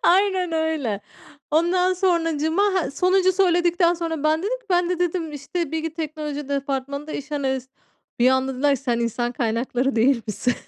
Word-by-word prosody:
Aynen 370 -1 +3
öyle. 315 -10 -1 0.5
Ondan 355 +4 +3
sonracığıma, 330 -2 +1
ha, 380 -4 +1
sonuncu 370 +4 +3
söyledikten 350 -2 +3
sonra 330 -3 -3
ben 310 +1 +3
dedim 475 +6 -1
ki: - - -30
"Ben 355 -1 +2
de", 360 - -1
dedim, 350 -2 -1
"işte, 295 +3 -4
bilgi 320 0 -3
teknoloji 300 -3 -5
departmanında 280 +1 -3
iş 300 +2 -6
analist." 265 -3 -2 0.5
Bir 250 +2 +5
anda 260 0 +1
dediler 280 +2 +2
ki: 270 - -14
"Sen 240 -3 0
insan 240 +1 -1
kaynakları 245 +3 -1
değil 235 +1 +3
misin?" 245 +4 -1
310 Hz, 165 wpm, -23 LUFS, 265-350 Hz, 0.5 s, Bir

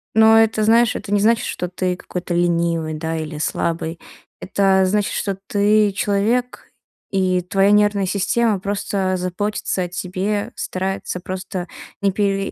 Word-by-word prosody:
Но 220 0 +7
это, 220 -1 +2
знаешь, 230 +1 +4
это 200 - -6
не 205 - +3
значит, 225 +3 +3
что 180 - -3
ты 180 0 -1
какой-то 180 -1 -5
ленивый, 170 -2 +1
да, 160 +1 -3
или 155 -1 -5
слабый. 165 +1 -2 0.4
Это 190 -1 +2
значит, 205 +2 0
что 195 -2 -2
ты 210 0 +3
человек, 215 +5 -1 0.4
и 185 -2 +1
твоя 195 +3 +2
нервная 205 -1 +3
система 205 +2 +1
просто 195 -1 -1
заботится 185 +1 -2
о - - -3
тебе, 200 +5 -3
старается 190 -1 -3
просто 185 0 -5 0.3
не 200 -1 +2
пере 195 0 0
195 Hz, 145 wpm, -20 LUFS, 180-210 Hz, 0.4 s, Но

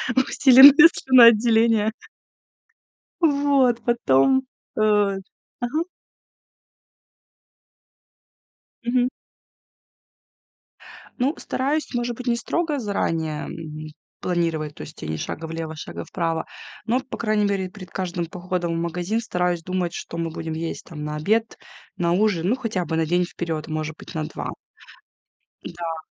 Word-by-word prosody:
усиленное 270 +4 +8
слюноотделение. 230 -3 +5 1.3
Вот, 280 -6 +3
потом, 240 - +3 0.3
э - - -1 0.8
ага. 280 +7 -1 3.0
Мгм. 245 +1 +1 2.1
Ну, 270 +5 +1
стараюсь, 285 +4 -2
может 240 -1 -2
быть, 250 +1 -8
не 235 - +2
строго 310 +4 -1
заранее 165 - -2 0.7
планировать, 165 -4 -1
то - - -9
есть - - -10
тебе 80 - -5
ни - - -2
шага 160 - -5
влево, 160 -1 -5
шага - - -7
вправо, 165 -2 -2 0.4
но, 240 +3 +2
по 265 - -8
крайней 215 -2 +1
мере, 195 -2 -1
перед 185 -1 -12
каждым 175 -2 -3
походом 175 0 -3
в 165 - -2
магазин 175 +6 -2
стараюсь 180 -5 -1
думать, 180 -1 -2
что - - -7
мы 165 -1 -2
будем 160 0 -5
есть 165 +1 -5
там 150 -3 -7
на 150 0 -4
обед, 220 +8 0 0.4
на 170 -1 +1
ужин, 185 -3 +1
ну, 245 - +2
хотя 220 -8 -2
бы 160 +1 -2
на 160 - +2
день 175 +2 +2
вперёд, 165 -3 -5
может 155 0 -4
быть, - - -11
на 155 -1 -2
2. 155 - -5 1.1
Да. 165 -2 -6
185 Hz, 125 wpm, -23 LUFS, 165-240 Hz, 3.0 s, усиленное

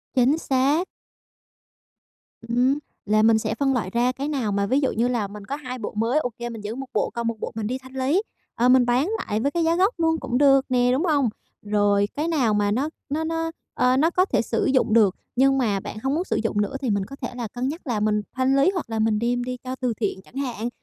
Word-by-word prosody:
Chính 260 +4 +4
xác. 285 +4 +1 1.6
Ừm, 250 +4 +2 0.3
là 215 +1 +3
mình 225 0 +5
sẽ 220 - -2
phân 275 -1 +1
loại 220 -8 -1
ra 240 +4 +1
cái 270 +2 -4
nào 265 -8 -1
mà 200 0 +1
ví 260 +7 +2
dụ 270 - +1
như 230 +3 +1
là 235 -5 -1
mình 205 0 -10
có 275 - -3
2 255 -3 -6
bộ 215 - -5
mới, 230 +7 +2
ô 250 - -2
kê 240 0 -4
mình 225 -2 -7
giữ 210 +2 -5
1 270 +1 -5
bộ, 210 - +1
còn 235 -1 -2
1 230 - -1
bộ - - -4
mình 220 -2 -2
đi 255 +3 -2
thanh 260 0 -15
lý, 265 +8 +1 0.3
ờ, 245 +2 +3
mình 255 -1 +6
bán 250 +8 +2
lại 210 - -2
với 280 +5 0
cái 340 +2 0
giá 330 +1 +2
gốc 385 +6 +3
luôn 325 -1 +2
cũng 245 - -2
được 275 -1 +5
nè, 245 -1 +3
đúng 275 +8 +1
hông? 285 -7 +2 0.3
Rồi, 205 -1 +2
cái 300 +3 -2
nào 270 -10 +2
mà 205 0 +1
nó 265 +8 0 0.2
nó 305 +3 -1
nó, 325 0 -2 0.2
ơ, 250 +1 +2
nó 315 +4 +4
có 365 +2 +2
thể - - +1
sử - - -1
dụng 260 -4 +2
được, 210 -5 +5 0.2
nhưng 270 +2 +4
mà 215 -7 +1
bạn 205 - -7
hông 270 +1 0
muốn 340 - 0
sử - - -2
dụng 210 -2 0
nữa 205 +6 -2
thì 260 - -1
mình 200 -2 0
có 275 - -10
thể 245 -2 -6
là 240 -2 -4
cân 245 +4 -3
nhắc 310 +3 -6
là 235 -4 0
mình 210 0 +1
thanh 260 +1 +2
lý 275 +5 +4
hoặc 360 -10 -4
là 225 -1 -2
mình 220 -1 +2
đem 245 +1 0
đi 250 0 -4
cho 255 0 -4
từ 250 -2 -1
thiện 205 -3 -3
chẳng 220 - -22
hạn, 245 -4 -3
250 Hz, 260 wpm, -24 LUFS, 220-275 Hz, 1.6 s, mình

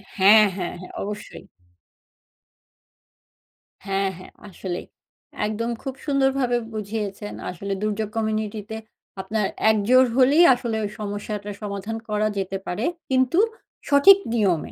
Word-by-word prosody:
হ্যাঁ, 210 +2 +7
হ্যাঁ, 180 -3 -4
হ্যাঁ। 185 - -10
অবশ্যই। 210 +1 -7 2.4
হ্যাঁ, 195 0 0
হ্যাঁ 185 - -13 0.2
আসলেই। 180 -1 -5 0.6
একদম 230 +2 -2
খুব 270 -2 -4
সুন্দর 275 -2 +3
ভাবে 245 -2 +1 0.2
বুঝিয়েছেন। 210 -1 -4 0.2
আসলে 195 +3 -4
দুর্যোগ 215 0 -1
কমিউনিটি 215 -1 -1
তে 220 - -4 0.4
আপনার 210 +1 -1 0.3
একজোর 245 +5 +4
হলেই 280 +6 +6
আসলে 240 -2 -3
ওই 205 - -2
সমস্যাটার 205 0 -5
সমাধান 205 +1 -4
করা 210 0 +1
যেতে 195 0 -2
পারে। 205 +7 -2 0.2
কিন্তু 260 +5 +2 0.5
সঠিক 285 +8 +8 0.2
নিয়মে। 195 -8 +1
210 Hz, 120 wpm, -23 LUFS, 200-235 Hz, 2.4 s, সঠিক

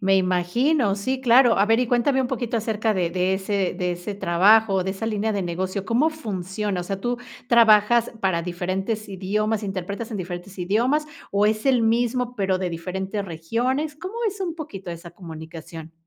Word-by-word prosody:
Me 195 0 +3
imagino, 195 - +2
sí, 260 +6 -2
claro. 245 -3 +5
A 200 - +4
ver, 225 +2 +3
y 250 - +1
cuéntame 250 +3 +2
un 250 - -1
poquito, 240 -2 -2
acerca 220 -1 0
de 175 -2 0
de 185 +1 +1
ese 195 -1 -1
de 180 -1 0
ese 175 +4 -5
trabajo, 195 +2 +4
de 190 - -1
esa 225 +3 -5
línea 215 0 0
de 200 -2 -1
negocio, 185 +3 -3
¿cómo 260 +8 +2
funciona? 200 - -3
O - - -5
sea, 195 +1 -4
¿tú 245 +3 -1 0.3
trabajas 230 0 +5
para 175 -3 +1
diferentes 190 +5 -3
idiomas, 210 +3 -1
interpretas 200 +3 -4
en 215 - -3
diferentes 180 +1 -7
idiomas, 240 +12 +1 0.2
o, 200 +1 +3
es 215 +4 0
el 250 -4 +4
mismo, 240 +2 +1
pero, 190 -3 +1
de 180 -2 -2
diferentes 190 +4 -4
regiones? 245 - -2
¿Cómo 370 +6 -7
es 400 -1 -3
un 345 -3 -2
poquito 200 - -7
esa 170 0 -8
comunicación? 165 -1 -10
205 Hz, 185 wpm, -23 LUFS, 185-235 Hz, 0.3 s, claro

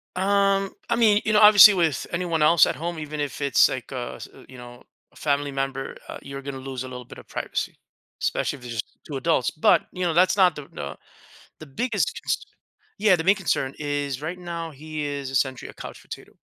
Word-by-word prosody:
Um, 195 +1 +2 0.2
I 235 - +2
mean, 215 -3 +4
you 215 - +1
know, 210 - +5
obviously, 210 0 +9
with 165 -7 0
anyone 170 -2 -1
else 155 +1 +6
at - - -2
home, 170 +2 -4
even 150 0 -6
if 145 -1 -3
it's, 140 -1 +4
like, 130 - -6
a, 125 -2 -5
s - - -9 0.2
you 130 - -12
know, 120 0 -12 0.3
a - - -28
family 145 -1 -1
member, 135 0 -3
uh, - - -6
you're 140 0 -8
gonna 140 0 -6
lose 130 -1 -6
a - - -7
little 125 -1 -8
bit - - -13
of - - -15
privacy, - - -4 0.5
especially - - -1
if 125 - -14
it's 120 - -6
just 110 -1 -6
2 145 - -4
adults. 135 -2 +1
But, 155 - +3
you 180 - -4
know, 170 - +1
that's 180 +4 +4
not 185 -3 +4
the 150 - -7
the 70 0 -6 0.6
the 155 - -10
biggest 200 - -2 0.8
yeah, 210 -2 +5
the 165 - -3
main 195 +4 +5
concern 140 -8 -1
is 145 -2 -3
right 175 +4 -5
now, 170 -2 -5
he 155 +1 -6
is 140 -2 -4
essentially 130 -1 -1
a - - -11
couch - - -10
potato. - - -10
150 Hz, 215 wpm, -24 LUFS, 135-180 Hz, 0.8 s, obviously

